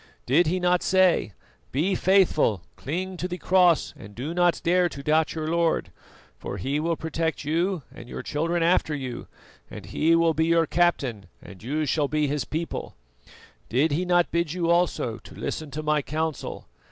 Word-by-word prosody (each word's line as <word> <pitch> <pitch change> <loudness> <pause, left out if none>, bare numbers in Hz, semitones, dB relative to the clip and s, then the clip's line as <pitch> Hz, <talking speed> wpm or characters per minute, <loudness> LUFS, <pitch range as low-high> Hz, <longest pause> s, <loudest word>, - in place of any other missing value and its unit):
Did 150 +7 +3
he 185 +3 0
not 180 0 +2
say: 185 - +3 0.4
'Be 165 +9 +1
faithful, 175 - +3
cling 185 +6 -4
to 180 - -3
the 180 0 -5
Cross, 180 -3 +3
and 100 +1 -12
do 140 +7 -4
not 175 0 +2
dare 175 +1 +3
to 140 -2 -9
doubt 155 +2 +2
your 155 -1 -3
Lord, 170 0 0 0.5
for - - -5
He 135 +9 -1
will 165 +2 0
protect 160 0 -2
you, 170 +3 0
and 120 - -11
your 125 - -6
children 165 +5 -1
after 165 -3 +2
you, 130 -4 -6 0.4
and - - -9
He 165 +2 +2
will 165 -1 +3
be 160 +2 +1
your 165 0 +3
Captain 135 - 0
and 95 -1 -13
you 150 +7 -1
shall 145 +1 +1
be 150 +1 0
His 145 0 -1
people'? 165 +2 -4 0.7
Did 140 +7 +2
he 160 +5 0
not 175 -1 +2
bid 170 -2 0
you 170 -2 0
also 170 -10 +1
to - - -14
listen 155 -2 -4
to 150 +3 -5
my 150 -1 +2
counsel? 155 +1 -4
160 Hz, 180 wpm, -25 LUFS, 145-175 Hz, 0.7 s, Did